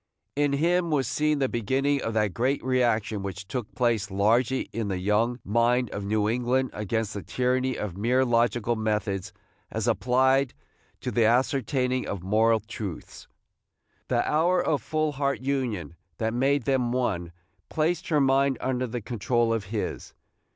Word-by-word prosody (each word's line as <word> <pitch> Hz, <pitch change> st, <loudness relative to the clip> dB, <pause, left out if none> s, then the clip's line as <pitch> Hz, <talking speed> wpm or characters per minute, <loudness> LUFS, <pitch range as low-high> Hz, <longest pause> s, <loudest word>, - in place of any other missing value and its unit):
In 145 Hz, 0 st, +1 dB
him 170 Hz, +4 st, +2 dB
was 140 Hz, -5 st, +1 dB
seen 150 Hz, +3 st, +1 dB
the 135 Hz, -2 st, +1 dB
beginning 135 Hz, +5 st, 0 dB
of 115 Hz, -, -3 dB
that 105 Hz, -3 st, +1 dB
great 130 Hz, +8 st, 0 dB
reaction 120 Hz, -4 st, +1 dB
which 95 Hz, 0 st, -6 dB
took 125 Hz, -2 st, -4 dB
place 120 Hz, -5 st, +1 dB
largely 115 Hz, +6 st, +2 dB
in 115 Hz, -2 st, -2 dB
the 95 Hz, -2 st, -2 dB
young 105 Hz, +6 st, +1 dB
mind 120 Hz, +3 st, +2 dB
of 105 Hz, -, -4 dB
New 105 Hz, +1 st, +1 dB
England 125 Hz, +3 st, 0 dB
against 105 Hz, +1 st, -2 dB
the 100 Hz, -, -5 dB
tyranny 130 Hz, +4 st, 0 dB
of 100 Hz, -5 st, -4 dB
mere 125 Hz, +6 st, +2 dB
logical 120 Hz, -1 st, +1 dB
methods 105 Hz, -3 st, -2 dB, 0.4 s
as -, -, -3 dB
applied 130 Hz, +1 st, +2 dB, 0.5 s
to -, -, -3 dB
the 115 Hz, -, +3 dB
ascertaining 130 Hz, +1 st, +1 dB
of 95 Hz, -3 st, -4 dB
moral 110 Hz, +3 st, +3 dB
truths. 105 Hz, -5 st, -7 dB, 0.8 s
The -, -, +1 dB
hour 175 Hz, +4 st, +3 dB
of 145 Hz, -7 st, 0 dB
full 155 Hz, +4 st, -1 dB
heart 140 Hz, -4 st, -1 dB
union 125 Hz, -, -2 dB, 0.2 s
that 110 Hz, 0 st, -1 dB
made 135 Hz, +2 st, +2 dB
them 125 Hz, -2 st, +1 dB
one 105 Hz, -9 st, -1 dB, 0.4 s
placed 160 Hz, +3 st, 0 dB
her 155 Hz, -3 st, +2 dB
mind 135 Hz, 0 st, +3 dB
under 130 Hz, -1 st, -1 dB
the 120 Hz, +1 st, -4 dB
control 115 Hz, +1 st, 0 dB
of 110 Hz, -3 st, -2 dB
his. 105 Hz, +2 st, -4 dB
120 Hz, 160 wpm, -26 LUFS, 110-135 Hz, 0.8 s, the